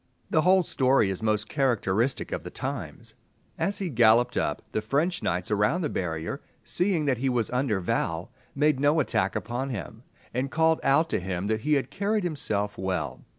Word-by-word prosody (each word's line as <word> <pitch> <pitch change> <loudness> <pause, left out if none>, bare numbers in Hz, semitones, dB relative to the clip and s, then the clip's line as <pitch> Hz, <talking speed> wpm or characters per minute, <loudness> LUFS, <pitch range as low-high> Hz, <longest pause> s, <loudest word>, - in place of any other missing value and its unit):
The 155 - +4
whole 185 +2 +5
story 130 - +2
is 95 - -4
most 110 -1 0
characteristic 120 -3 0
of - - -2
the - - -8
times. - - -6 0.5
As 200 - 0
he 195 - -2
galloped 120 -1 +4
up, - - -1
the 110 - -1
French 150 +11 0
knights 90 +4 -2
around 105 - +2
the 155 - -1
barrier, 80 -3 -3 0.2
seeing 180 -4 0
that 130 -4 +1
he 135 +1 +1
was 120 -3 0
under 125 -5 0
vow, 85 +1 -1 0.3
made 145 -1 +2
no 145 +3 +3
attack 110 -9 0
upon 125 +3 -3
him, 100 - -6 0.3
and 130 +3 -1
called 160 +2 +3
out 155 +4 +3
to - - +1
him 90 0 -3
that 110 +1 0
he 150 +3 +2
had 135 -2 -1
carried 205 +1 0
himself 105 - -2
well. 90 -5 -3
125 Hz, 185 wpm, -27 LUFS, 105-150 Hz, 0.5 s, whole